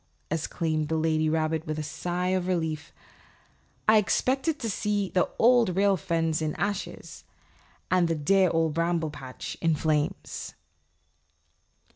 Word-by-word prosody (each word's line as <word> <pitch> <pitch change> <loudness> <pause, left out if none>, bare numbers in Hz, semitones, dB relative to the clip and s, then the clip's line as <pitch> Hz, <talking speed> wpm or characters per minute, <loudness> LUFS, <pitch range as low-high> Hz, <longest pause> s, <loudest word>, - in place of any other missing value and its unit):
exclaimed 155 -1 -1
the 160 - -1
lady 155 0 +1
rabbit 160 0 0
with 155 0 -2
a 155 - -2
sigh 175 +4 -2
of 185 -1 0
relief, 160 -4 -2 1.0
"I 215 0 +7
expected 270 +8 +1
to 235 - -4
see 205 -2 -1
the 180 - +2
Old 235 -6 +4
Rail 200 0 +4
Fence 165 -4 -1
in 155 -1 -1
ashes 200 +3 -4 0.7
and 180 -2 +4
the 165 - 0
dear 185 +5 +3
Old 165 -2 +1
Bramble 165 -1 0
Patch 135 -3 -8
in 165 -2 +2
flames." 150 -1 -2
165 Hz, 135 wpm, -27 LUFS, 155-195 Hz, 1.0 s, I